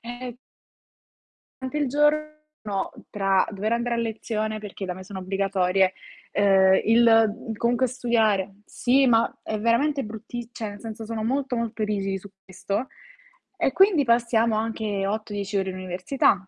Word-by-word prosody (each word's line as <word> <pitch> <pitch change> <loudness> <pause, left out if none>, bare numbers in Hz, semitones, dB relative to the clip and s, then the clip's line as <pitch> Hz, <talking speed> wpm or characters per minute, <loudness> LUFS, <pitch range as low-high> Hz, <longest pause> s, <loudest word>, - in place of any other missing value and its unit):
ehm 245 +1 -7 1.3
rante 260 +3 -3
il 290 -3 +1
giorno, 300 +2 +2 0.8
tra 195 -2 +2
dover 210 +2 -2
andare 235 0 0
a - - -2
lezione 220 -1 -2
perché 205 -2 -7
da 185 - -3
me 185 0 -10
sono 190 0 -7
obbligatorie, 190 0 +1 0.4
uhm, 190 -2 +5
il 225 0 +4
comunque 240 +3 +2
studiare 220 -6 +1
sì, 265 +2 +2
ma 230 -1 +2
è 215 - -3
veramente 270 +6 +2
brutti 225 +2 -7
cioè 220 -3 -5
nel 205 - -11
senso, 225 -1 -7
sono 225 -1 -4
molto, 265 +1 -1
molto 230 -1 -3
rigidi 195 -2 -1
su 200 - -12 0.2
questo 200 +6 -3 0.7
e - - +1
quindi 370 -2 +5
passiamo 235 -2 +2
anche 215 -3 -2
8-10 205 -1 -3
ore 190 -1 0
in 185 - -5
università. 185 +2 0
220 Hz, 145 wpm, -25 LUFS, 195-240 Hz, 1.3 s, uhm